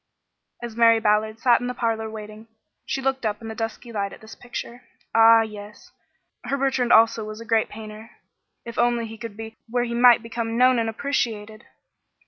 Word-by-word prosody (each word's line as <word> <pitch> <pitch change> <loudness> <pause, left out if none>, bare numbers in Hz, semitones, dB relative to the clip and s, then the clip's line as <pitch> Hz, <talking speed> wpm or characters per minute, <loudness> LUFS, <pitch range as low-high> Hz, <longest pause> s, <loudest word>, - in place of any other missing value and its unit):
As 235 -2 -6
Mary 230 -1 +5
Ballard 215 0 +1
sat 245 0 +3
in 245 - -3
the 250 - -4
parlor 225 -2 -2
waiting, 215 0 -10 0.4
she 270 - -3
looked 270 -1 -1
up 210 -2 -2
in 225 - -8
the - - -5
dusky 225 +2 -6
light 200 -3 -3
at - - -12
this 220 0 -13
picture. 245 0 -8 0.3
Ah, 225 0 +7
yes! 210 -1 -11 0.5
Her 275 +3 -1
Bertrand 260 -3 0
also 225 0 +5
was 215 0 -8
a 230 - -9
great 225 0 +1
painter. 215 +1 -10 0.6
If 235 - -6
only 240 -1 +1
he 225 0 -10
could 230 -3 -8
be 225 0 -9
where 245 +1 0
he 235 -1 -4
might 240 -1 +5
become 230 0 -4
known 255 0 +4
and 225 -1 -1
appreciated! 220 -4 -3
225 Hz, 190 wpm, -23 LUFS, 220-240 Hz, 0.6 s, Ah